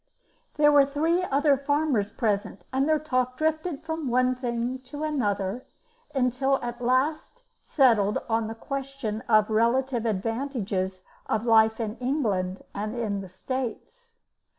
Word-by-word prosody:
There 295 0 +5
were 290 -1 +7
three 315 +6 +1
other 290 -4 +3
farmers 280 -6 0
present, 205 -5 -2
and 270 +3 +1
their 310 - +4
talk 255 -4 -1
drifted 315 0 -1
from 320 -2 -3
one 255 +1 +2
thing 245 0 -3
to 280 +4 -8
another 220 -6 -1 0.5
until 265 +1 +2
it - - -5
at 240 0 -5
last 280 - 0 0.2
settled 225 -8 +3
on 225 -1 0
the 225 - -6
question 270 -3 -4
of 215 -2 +5
the 220 - -3
relative 235 +1 +2
advantages 205 -4 -2 0.2
of 220 +1 -1
life 220 -1 +4
in 220 0 -3
England 210 -9 -1
and 215 -1 -3
the 190 - -10
States. 265 - -6
250 Hz, 140 wpm, -26 LUFS, 220-280 Hz, 0.5 s, were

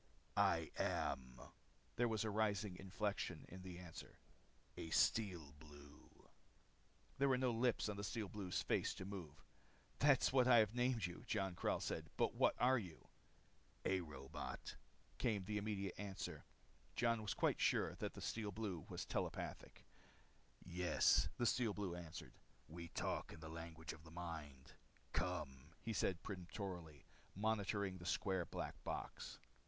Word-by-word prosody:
"I - - +3
am" 65 -1 0 0.6
there 120 +1 +3
was 110 -2 +1
a 110 - 0
rising 105 -2 +1
inflection 95 -4 -2
in 95 +1 -8
the 90 -1 -6
answer 90 -2 -9 0.6
"a 80 - -5
Steel 85 -6 +3
Blue." 75 -1 -14 0.9
There 140 0 +5
were 130 - +5
no 125 -1 +3
lips 120 0 +2
on 105 -1 -2
the 100 - -3
Steel 110 0 -1
Blue's 95 -3 -2
face - - +2
to 95 - -5
move. 95 -7 -7 0.5
"That 145 -3 +6
is - - +4
what 130 -2 +6
I 125 -2 +9
have 110 -1 +5
named 120 -4 +2
you," 85 0 -5
Jon 95 -1 +1
Karyl - - +1
said. - - -2
"But - - +3
what - - +4
are 130 +1 +6
you?" 90 -7 -9 0.8
"A 95 -1 +3
robot," 70 -5 -6 0.4
came 110 -6 +1
the 105 +1 0
immediate 100 -3 -1
answer. 100 -2 -4 0.5
Jon 115 -1 +3
was 105 -2 -1
quite - - +2
sure - - +4
then - - -10
that - - -2
the - - -7
Steel 110 -2 -1
Blue 100 -6 -3
was - - -3
telepathic. - - -3 0.8
"Yes," 90 0 +4
the 120 - +2
Steel 115 -3 +3
Blue 100 -4 -2
answered. 85 -1 -7 0.3
"We 85 +2 -6
talk - - -2
in - - -10
the 80 -1 -7
language 80 0 -6
of 75 - -13
the 80 - -12
mind. 80 -5 -6 0.4
Come!" 75 -4 -2
he 115 - -1
said 95 -3 +1
peremptorily, 90 -5 -5 0.3
motioning 100 -1 +1
with 95 - -8
the 85 - -8
square 95 -3 +1
black - - -4
box. - - -4
95 Hz, 160 wpm, -42 LUFS, 85-110 Hz, 0.9 s, I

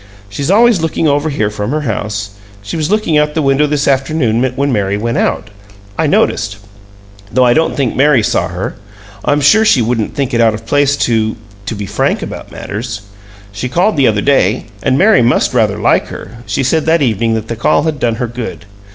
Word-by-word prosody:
She's 140 +9 -4
always 225 -1 +4
looking 160 0 0
over 145 +2 +1
here 110 -7 -1
from 105 0 -4
her 155 +3 -1
house; 105 -5 -3 0.3
she 100 - -5
was 155 -1 -1
looking 205 -7 +2
out 150 0 0
the 160 - +1
window 135 +2 +2
this 145 0 -1
afternoon 135 -4 +1
when 140 +1 0
Mary 100 -2 0
went 115 +2 -1
out, 105 - -1 0.4
I - - 0
noticed 100 -1 +1 0.7
though 130 +2 +3
I 120 - +4
don't 160 +4 +1
think 135 -4 0
Mary 135 -4 +3
saw - - 0
her. - - -5 0.5
I'm 145 - +1
sure 220 +10 +5
she 210 - +4
wouldn't 115 -1 -1
think 140 -3 -2
it 115 - +2
out 110 -1 +3
of 110 +1 -10
place 145 +3 +2
to 110 -2 0 0.3
to 115 - -3
be 100 0 -5
frank 100 - -1
about - - -8
matters. 110 0 -6 0.5
She 105 +6 -4
called 185 - +1
the 140 -3 +3
other 105 -2 +1
day, 130 -5 +1 0.2
and 130 +1 +1
Mary 210 - +5
must 120 +2 +2
rather 110 -4 +1
like 105 - +2
her 110 +5 -10
she - - -1
said 155 +4 0
that 160 -1 +3
evening 115 -2 0
that 110 0 -4
the 115 - -4
call 115 - +1
had 155 -3 -2
done 115 -2 0
her 125 +1 -3
good. 115 -3 -7
125 Hz, 210 wpm, -14 LUFS, 110-150 Hz, 0.7 s, sure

